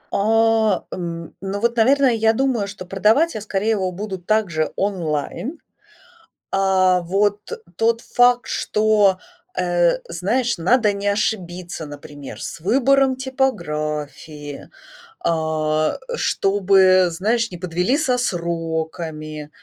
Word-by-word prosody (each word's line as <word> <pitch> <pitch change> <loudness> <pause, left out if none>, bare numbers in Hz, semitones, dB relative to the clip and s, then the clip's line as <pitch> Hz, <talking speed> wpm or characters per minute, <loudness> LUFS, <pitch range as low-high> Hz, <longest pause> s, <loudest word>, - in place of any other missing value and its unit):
А, 220 -1 +2
н 170 -2 -6
ну, 195 +1 -3
вот, 235 +1 +1
наверно, 270 +5 +4
я 225 -3 +3
думаю, 245 -4 0
что 195 -2 -8
продавать 215 - +2
я, 215 - -5
скорее, 210 +1 -1
его 190 -4 0
будут 190 -1 -6
также 190 -8 +1
онлайн. 190 - -2 0.9
А 185 -2 +3
вот 200 +4 +1 0.4
тот 230 +3 +2
факт, 245 0 +2
что, 210 -3 +2 0.4
э, 175 -1 +2
знаешь, 215 +8 -1
надо 210 +5 +3
не 200 0 -5
ошибиться, 180 -5 -2
например, 145 -1 -10
с - - -6
выбором 265 - +3
типографии. 150 - -3 0.5
А, 155 -1 0 0.2
чтобы, 190 - +3
знаешь, 225 +7 0
не 180 - -8
подвели 180 - 0
со 255 -5 +1
сроками, 160 -5 -3
195 Hz, 110 wpm, -21 LUFS, 170-225 Hz, 0.9 s, наверно